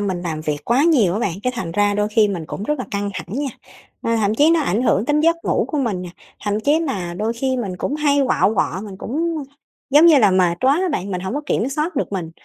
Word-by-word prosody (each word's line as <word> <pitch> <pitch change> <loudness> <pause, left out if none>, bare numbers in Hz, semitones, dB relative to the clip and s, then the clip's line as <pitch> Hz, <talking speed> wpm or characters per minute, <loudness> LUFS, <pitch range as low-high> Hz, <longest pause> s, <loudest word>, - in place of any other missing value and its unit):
mình 190 -3 -2
làm 160 -3 -3
việc 150 -1 -2
quá 250 +5 +2
nhiều 250 - +4
á 210 - -1
bạn, 200 -6 -1
cái 250 - 0
thành 170 -7 -4
ra 205 +2 +2
đôi 210 0 0
khi 215 0 +3
mình 175 -5 -4
cũng 195 - -6
rất 300 +6 -1
là 255 - -3
căng 200 -1 -2
thẳng 185 - -6
nha, 285 -1 -1 0.5
à, 230 0 0
thậm 210 -1 +1
chí 295 +7 +4
nó 335 -1 +3
ảnh 235 - 0
hưởng 215 -4 +2
đến 295 +3 +1
giấc 335 +2 +3
ngủ - - +1
của 305 - -2
mình 215 -9 -1
nè, 180 - -7 0.4
thậm 205 +1 0
chí 295 +7 +2
mà 190 - -3
đôi 215 +4 -1
khi 260 +2 -1
mình 195 -7 -4
cũng 275 - -2
hay 290 -2 +2
quạu 220 -4 +2
quọ, 190 -2 0
mình 200 -3 -9
cũng, 330 +7 -2 0.6
giống 295 +5 +7
như 310 -4 +7
là, 210 -5 +5
mệt 180 -2 +2
quá 265 +1 +4
á 375 - 0
bạn, 195 -3 -3
mình 180 -2 -3
hổng 190 +5 -4
có 290 - -1
kiểm 250 -2 0
soát 305 +4 -2
được 265 - -2
mình, 170 -4 -3
220 Hz, 275 wpm, -20 LUFS, 190-285 Hz, 0.6 s, giống